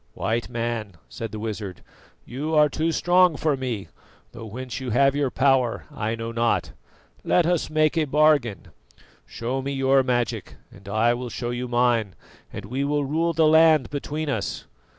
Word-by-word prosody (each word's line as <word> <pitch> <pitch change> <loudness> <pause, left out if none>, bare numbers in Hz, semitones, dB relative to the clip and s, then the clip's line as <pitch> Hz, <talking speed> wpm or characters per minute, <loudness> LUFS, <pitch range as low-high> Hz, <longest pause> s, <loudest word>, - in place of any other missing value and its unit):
"White 115 +1 -2
Man," 115 -4 -3
said 115 -1 -6
the 110 - -6
wizard, 105 -4 -6 0.4
"you 150 +6 -3
are 150 -1 +5
too 160 +3 -1
strong 175 +1 +3
for 155 -3 +1
me, 120 -8 -4 0.4
though 115 - -9
whence 125 +4 -6
you 130 -2 -5
have 135 +4 +3
your 145 -2 +1
power 130 -3 +1
I 110 +1 -3
know 115 0 -5
not. 115 0 0 0.5
Let 175 - +3
us 175 -1 0
make 155 +1 +2
a 155 - +2
bargain. 145 - +2 0.6
Show 125 +3 -3
me 140 +1 -3
your 135 0 +3
magic 125 -2 -2 0.2
and 100 0 -13
I 110 +3 +2
will 125 0 -5
show 120 0 -4
you 125 +1 -3
mine, 120 -6 +1 0.4
and 100 - -7
we 130 +6 -2
will 145 0 0
rule 165 +4 0
the 160 0 +3
land 155 -4 +5
between 150 +2 -4
us. 140 - -3
130 Hz, 170 wpm, -24 LUFS, 115-150 Hz, 0.6 s, are